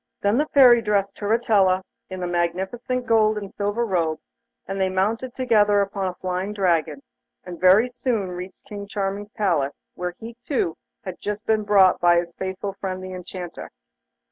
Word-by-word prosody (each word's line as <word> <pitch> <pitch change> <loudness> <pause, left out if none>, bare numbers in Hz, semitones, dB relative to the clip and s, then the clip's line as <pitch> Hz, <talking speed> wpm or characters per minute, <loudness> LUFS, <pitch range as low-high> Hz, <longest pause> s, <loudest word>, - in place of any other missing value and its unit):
Then 205 +5 +2
the 300 - +1
Fairy 250 -5 +6
dressed 200 -2 0
Turritella 205 -4 +2 0.3
in 185 -1 -5
a - - -1
magnificent 190 +9 -2
gold 220 -2 +3
and 200 -2 -6
silver 205 +3 -1
robe, 165 -6 0 0.5
and 195 +1 -3
they 190 - +2
mounted 220 +7 -1
together 210 -5 +3
upon 195 -1 -1
a 180 - -4
flying 185 +3 -3
Dragon, 165 -7 0 0.4
and 175 -2 -9
very 190 +6 +6
soon 245 -6 -2
reached 180 +1 -8
King 205 -1 -7
Charming's 200 0 -3
palace, 165 -9 -1
where 180 0 -4
he, 230 +1 -9
too, 240 - -1 0.3
had 185 -2 -7
just 210 +1 -4
been 220 -1 +2
brought 200 -3 +4
by 175 0 +5
his 170 0 -2
faithful 190 +2 -4
friend 185 -1 -5
the 185 0 -7
Enchanter. 180 -1 -8
195 Hz, 170 wpm, -23 LUFS, 185-215 Hz, 0.5 s, Fairy